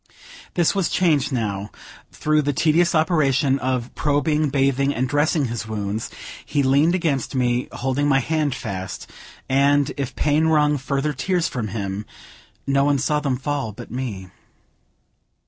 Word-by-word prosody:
This 175 -3 +3
was 195 -3 0
changed 155 -7 +2
now; 105 -6 -1
and, 100 +2 -7 0.4
through 155 0 +1
the 145 0 -1
tedious 165 +4 +2
operation 145 -4 +2
of 130 -2 -2
probing, 150 +1 +1
bathing, 140 0 +1
and 130 +2 0
dressing 145 +2 +1
his 115 -2 -4
wounds, 105 0 -3 0.3
he 145 -2 0
leaned 140 +6 +3
against 145 -7 -1
me, 125 -1 +1
holding 135 +3 -1
my 135 -2 +4
hand 150 0 0
fast, 95 -6 -5 0.4
and, 140 +1 +3
if 140 -3 -4
pain 155 +2 +2
wrung 150 -2 +3
further 140 +2 -1
tears 175 +5 0
from 120 -4 -3
him, 100 0 -4 0.6
no 140 0 +2
one 145 0 +3
saw 150 +3 +1
them 140 -4 -1
fall 135 -4 -3
but - - -10
me. 110 -7 -5
140 Hz, 150 wpm, -22 LUFS, 125-150 Hz, 0.6 s, my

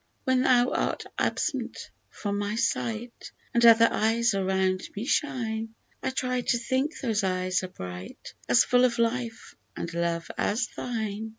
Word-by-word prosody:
When 260 -1 +2
thou 250 -1 +4
art - - -1 0.2
absent - - -2 0.2
from 205 -1 -3
my 205 +1 -2
sight, 235 +1 -2 0.2
And 235 - +3
other 230 0 +8
eyes 230 +1 +2
around 190 -1 +1
me 210 +3 -4
shine, 225 -6 -1 0.3
I - - -1
try 255 -1 -1
to 240 - +1
think 260 +6 -1
those 225 -6 0
eyes 185 -1 0
as 185 - -5
bright, 90 - -8 0.2
As 120 - +6
full 250 0 +3
of 245 -1 +3
life 230 0 -2 0.2
and 170 0 -4
love 170 -1 -1
as 230 +4 0
thine. 220 -2 -3
225 Hz, 155 wpm, -27 LUFS, 190-245 Hz, 0.3 s, other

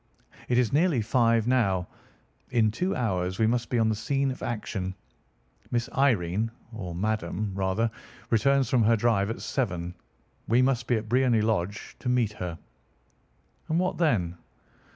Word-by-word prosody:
It 120 - +2
is 125 -2 +2
nearly 150 -6 +3
five 115 -1 +3
now. 100 -8 +2 0.6
In 110 -3 +3
two 180 - -1
hours 95 -6 -1
we 110 - +3
must 120 +1 0
be 125 - 0
on 115 -1 +3
the - - +2
scene 135 +5 0
of 130 - -8
action. 95 -5 -3 0.7
Miss 120 -1 0
Irene, 110 -6 +2 0.2
or 90 -6 -6
Madame, 105 0 -2
rather, 95 +4 0 0.4
returns 135 +3 +3
from 125 0 +2
her 115 +1 +4
drive 105 -3 +2
at 115 - -4
seven. 90 -9 -2 0.5
We 120 +3 +4
must 130 -2 +1
be 120 - +3
at 110 0 -3
Briony 120 -1 +3
Lodge 105 -2 -2
to 125 - -3
meet 120 -4 +2
her." 90 -4 -5 1.1
"And 160 - +1
what 180 0 0
then?" 95 - +1
115 Hz, 155 wpm, -27 LUFS, 100-125 Hz, 1.1 s, her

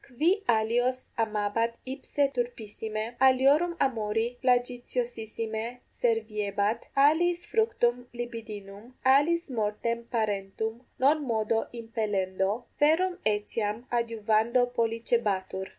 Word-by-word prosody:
qui 275 +5 -2 0.2
alios 240 +3 +2 0.2
amabat 215 +2 -1 0.2
ipse 285 +1 -1
turpissime, 220 -3 -3 0.2
aliorum 280 +7 +4
amori 225 0 -2
flagitiosissime 240 -3 -1 0.3
serviebat, 215 -2 0 0.2
aliis 345 +4 +3
fructum 430 - +1
libidinum, 220 -3 -7 0.2
aliis 290 +6 +4
mortem 230 +1 -1
parentum 220 0 -2 0.2
non 295 +3 +3
modo 225 -2 +1
impellendo, 210 -2 -1 0.2
verum 335 +5 +3 0.2
etiam 210 +2 -3
adiuvando 230 +1 +2
pollicebatur. 225 -5 0
230 Hz, 85 wpm, -28 LUFS, 215-250 Hz, 0.3 s, aliorum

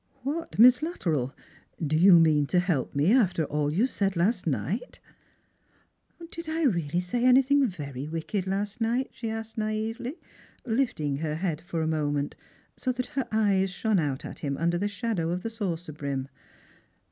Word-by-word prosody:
'•' - - -47 0.2
What, 305 +5 -4
Miss 250 +4 +7
Luttrell, 160 - -1 0.5
do 155 -2 0
you 175 +1 +7
mean 150 -3 +4
to 180 - +2
help 175 -9 -1
me, 150 +9 +3
after 190 -10 +3
all 145 0 -1
you 195 +10 +2
said 195 -7 -1
last 185 +8 +1
night? - - -2 0.5
" - - -39
" 335 -1 -17
Did 335 -1 -7
I 325 +1 -1
really 170 - +1
say 180 +7 -2
anything 265 +2 +5
very 145 - -6
wicked 165 +5 -3
last 200 +4 -2
night? 240 +4 0
" - - -36
she 225 - -5
asked 225 0 -5
naively, 220 +5 -2 0.5
lifting 220 - 0
her 155 0 -2
head 165 -2 -2
for 165 -2 -3
a - - -1
moment 145 -2 -1 0.4
so 255 - -1
that 250 0 -3
her 270 -2 -1
eyes 200 -3 +2
shone 205 +2 +1
out 140 -4 -2
at - - -8
him 140 -2 -3
under 170 +1 +1
the 205 - 0
shadow 205 -5 -2
of 180 +1 -2
the 225 - -3
saucer 175 -7 -4
brim. 140 -2 -4
190 Hz, 180 wpm, -27 LUFS, 155-230 Hz, 0.5 s, Miss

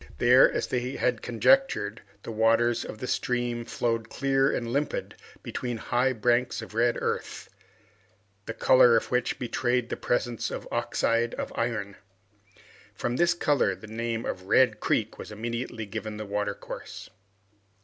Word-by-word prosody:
There, 125 +2 +6
as - - -1
they 125 +1 -2
had 125 -3 0
conjectured, 120 - +2 0.2
the - - -6
waters 115 +2 +2
of - - -7
the 125 - -5
stream 120 -1 -1
flowed 115 -1 -2
clear 135 0 +1
and 120 - -2
limpid 145 +1 -2 0.3
between 120 -2 -4
high 125 +4 +1
banks 120 +2 +1
of 110 - -11
red 120 +1 +2
earth, - - -4 1.0
the 115 - -3
color 125 -3 +6
of - - -3
which 125 -1 0
betrayed 125 0 -1
the - - -2
presence 120 -2 -1
of - - -6
oxide 115 0 0
of - - -5
iron. 105 -4 -2 1.0
From 120 +1 -2
this 175 +2 +3
color, 145 - +2
the 110 - -12
name 115 +1 -3
of 95 0 -5
Red 115 -1 +4
Creek 110 -1 -1
was - - -8
immediately 115 +1 -4
given 105 +1 -6
to 110 - -4
the 100 - -11
watercourse. 105 0 -5
120 Hz, 150 wpm, -27 LUFS, 110-125 Hz, 1.0 s, There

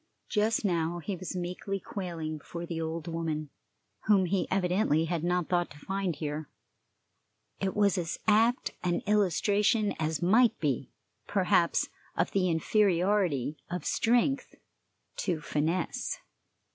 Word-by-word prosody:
Just 215 +1 +1
now 170 -2 0
he 185 +4 -4
was 185 0 -6
meekly 180 +2 -3
quailing 165 -6 -5
before 170 +3 -7
the 165 -1 -4
old 160 0 -4
woman, 160 -3 -3 0.6
whom 200 -3 +5
he 185 +1 0
evidently 180 -4 +2
had 165 -1 -2
not 175 -1 +1
thought 175 -1 +1
to 145 - -13
find 190 +2 -2
here. 150 -1 -4 1.1
It 195 -1 -1
was 200 -3 +3
as 170 0 -3
apt 225 +4 +3
an 175 -1 +1
illustration 210 +2 +2
as 160 0 0
might 220 +6 +4
be, 140 -6 -1 0.4
perhaps, - - +2 0.3
of - - +1
the 185 -2 +2
inferiority 175 - +2
of 180 +1 -4
strength 245 +4 +1 0.6
to 175 -5 -1
finesse. 160 +4 -1
180 Hz, 130 wpm, -29 LUFS, 160-200 Hz, 1.1 s, whom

